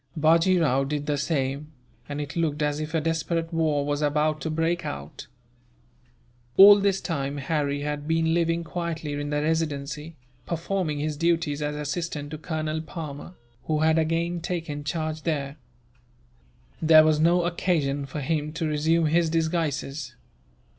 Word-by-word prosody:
Bajee 165 +4 +4
Rao 135 -4 +2
did 145 +1 -3
the 150 -1 0
same, 140 0 -2 0.4
and 145 0 -4
it 145 0 -5
looked 155 -3 0
as 150 0 0
if 155 +2 -4
a 160 - +2
desperate 165 +1 -1
war 155 -3 +1
was 145 0 -1
about 150 +1 +1
to 160 - -2
break 165 +2 0
out. 75 - -7 1.3
All 205 +1 +10
this 195 -1 +1
time, 140 -6 -3
Harry 145 0 -1
had 145 0 -4
been 160 0 +2
living 170 0 +1
quietly 165 -3 -4
in 145 0 -3
the 150 0 0
Residency, 150 -1 -2 0.3
performing 170 -2 -2
his 150 +1 -2
duties 165 -3 0
as 150 0 -2
assistant 150 0 -4
to 155 - -6
Colonel 155 -1 -3
Palmer, 160 +1 -8 0.3
who 155 -1 0
had 160 +1 +4
again 165 +2 0
taken 160 -4 -4
charge 155 +1 -3
there. 145 -3 -2 1.2
There 155 -1 +7
was 155 -1 +3
no 170 +2 +4
occasion 155 -5 0
for 150 +2 -5
him 150 +1 -1
to 165 0 -2
resume 160 +2 +2
his 165 +2 +2
disguises. 155 -5 -2
155 Hz, 155 wpm, -25 LUFS, 145-165 Hz, 1.3 s, All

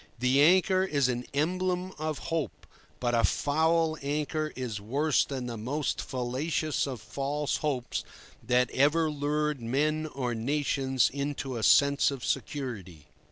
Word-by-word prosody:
The 125 +3 +3
anchor 185 +3 +5
is 140 -8 +1
an 125 0 -2
emblem 180 +5 -1
of 155 -1 -2 0.2
hope, 165 -3 -3 0.3
but 120 -1 0
a 115 -1 +3
foul 160 +1 +2
anchor 150 +2 -2
is 120 -5 -4
worse 140 +8 +2
than 130 -3 -5
the 120 -2 -5
most 140 +7 -2
fallacious 135 +5 -1
of 130 -4 -5
false 140 +7 -2
hopes 135 -5 -2 0.4
that 125 +2 +2
ever 150 +4 +3
lured 150 -1 -1
men 150 +6 0
or 130 -5 -3
nations 135 +1 +1
into 140 -2 -3
a 115 - -3
sense 140 +5 +5
of 135 -3 -5
security. 95 - -4
140 Hz, 140 wpm, -29 LUFS, 125-155 Hz, 0.4 s, anchor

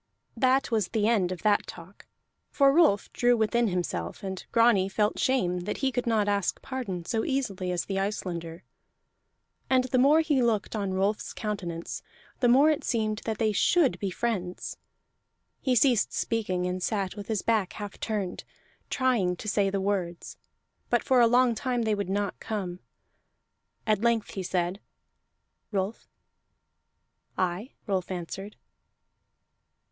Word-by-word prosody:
That 255 +2 +2
was 215 -5 +1
the 215 +2 0
end 200 -6 +2
of 180 -3 -6
that 210 -1 +3
talk, 180 +3 -12 0.4
for 275 -1 +4
Rolf 300 - +3
drew 245 0 +3
within 230 +2 +2
himself, 175 - -3
and 190 -1 -5
Grani 230 -5 +4
felt 210 +2 0
shame 180 -9 +1
that 190 +4 -4
he 265 - +2
could 245 -1 -2
not 220 -3 +2
ask 200 -3 0
pardon 200 -10 -4
so 225 +2 -1
easily 200 -10 -2
as 175 -1 -1
the 195 -1 -2
Icelander; 175 -4 -4 1.1
and 255 -1 +4
the 255 0 +1
more 290 +5 +6
he 300 -5 +2
looked 225 -3 0
on 200 -3 -1
Rolf's 200 +3 -1
countenance 180 -6 -4 0.4
the 245 - +3
more 275 +6 +6
it 300 - -2
seemed 215 -3 0
that 220 -2 -2
they 220 -1 +2
should 275 - +3
be 200 - -1
friends. 185 -3 -3 0.9
He 260 -2 +1
ceased 245 -2 +3
speaking, 185 -6 -1
and 180 0 -2
sat 195 -1 -1
with 205 -2 -8
his 220 -3 -1
back 215 -5 +1
half 205 -2 -7
turned, 205 -5 -3 0.5
trying 240 -9 +1
to 215 - -9
say 200 -1 +2
the 195 0 -1
words; 190 -3 -2 0.5
but 240 - +2
for 255 -2 +4
a 235 - +7
long 245 +1 +4
time 245 0 -1
they 220 -1 +1
would 200 -2 -2
not 200 0 -1
come. 190 -5 -4 1.1
At 215 -2 +2
length 230 -2 +1
he 195 - -4
said: 180 +1 -1 0.9
"Rolf." 195 +2 -2 1.3
"Aye?" 185 +7 -2
Rolf 190 -3 -1
answered. 190 +3 -6
210 Hz, 150 wpm, -28 LUFS, 185-235 Hz, 1.3 s, a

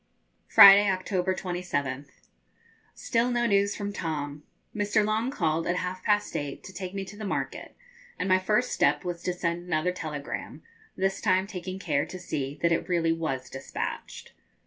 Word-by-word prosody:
Friday, 200 +1 +9
October 185 0 0
27th. 145 -8 -3 0.9
Still 235 +1 0
no 240 -1 +1
news 200 -2 +2
from 205 0 -4
Tom. 150 -5 -4 0.3
Mr. 210 0 +2
Long 220 +3 0
called 165 - 0
at 175 - +1
half 180 0 -4
past 210 0 +1
eight, 145 -2 -4
to 190 - -10
take 185 0 -6
me 195 -1 -3
to 195 +2 -11
the 215 - -8
market, 200 - -4 0.4
and - - -2
my 185 0 +4
first 210 +6 +1
step 145 +4 +2
was 175 -1 -4
to 180 - -1
send 175 0 -3
another 175 +1 +1
telegram, 150 -5 -6 0.3
this 195 0 -1
time 185 +1 +2
taking 185 -2 -6
care 145 -7 0
to 185 - -7
see 145 -6 -4
that 170 - +4
it 165 - 0
really 170 -2 +2
was 155 -6 -3
despatched. 135 0 -6
180 Hz, 170 wpm, -27 LUFS, 160-200 Hz, 0.9 s, Friday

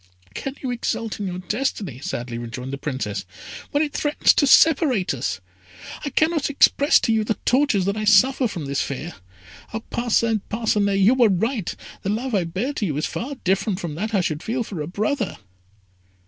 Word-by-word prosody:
"Can 270 - -5
you 255 - -1
exult 230 -2 -3
in 200 - -2
your 180 -1 -4
destiny," 195 - -3
sadly 120 -3 -4
rejoined 125 +3 -6
the - - -3
Princess, 130 -9 -3 0.5
"when 290 +2 +1
it 290 -2 -4
threatens 295 0 +3
to 285 - +3
separate 270 - +4
us? 125 -6 -3 0.6
I 285 - -2
cannot 315 +1 +1
express 285 +1 +4
to 225 - +1
you 220 -1 +2
the 215 +1 -1
tortures 250 -8 +3
that 200 +1 0
I 215 0 -2
suffer 260 +4 +5
from 175 -8 -6
this 140 +1 -1
fear! 145 +5 -4 0.6
Ah, 220 - -2
Parcin 230 -2 +1
Parcinet, 210 -3 +1
you 200 +6 +5
were 245 -4 +4
right! 215 +2 -1 0.3
The 195 - -3
love 240 +5 -2
I 190 -4 +2
bear 195 +12 -2
to 215 - -2
you 145 -4 -2
is 155 - 0
far 275 +5 -4
different 195 +1 0
from 170 -6 -4
that 215 +7 -3
I 195 - +3
should 155 -3 -2
feel 235 +4 -2
for 190 -7 -6
a 150 - -4
brother!" 215 - -2
210 Hz, 190 wpm, -23 LUFS, 175-255 Hz, 0.6 s, suffer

